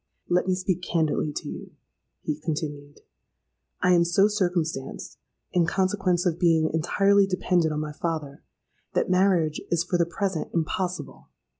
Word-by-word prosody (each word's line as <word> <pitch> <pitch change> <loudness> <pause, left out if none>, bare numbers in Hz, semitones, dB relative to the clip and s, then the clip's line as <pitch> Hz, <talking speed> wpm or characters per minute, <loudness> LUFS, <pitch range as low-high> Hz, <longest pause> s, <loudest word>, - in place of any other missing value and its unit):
'—'Let 180 +1 +1
me 185 - +2
speak 185 -1 -1
candidly 160 -3 0
to - - -6
you,' - - -7 0.5
he 150 - -1
continued. 150 -2 -5 0.8
'I 180 - +5
am 170 -1 +5
so 175 +4 +4
circumstanced, 175 -9 -2 0.3
in 175 -2 +3
consequence 185 -1 +1
of 170 -1 0
being 160 -2 +3
entirely 195 +5 +3
dependent 180 -3 +1
on 150 0 -2
my 150 -1 -5
father, 150 -3 -4 0.5
that - - +1
marriage 180 -4 +2
is 170 -1 +1
for 175 0 -1
the 170 - +3
present 185 -1 -2
impossible. 170 -3 -3
175 Hz, 145 wpm, -26 LUFS, 155-185 Hz, 0.8 s, I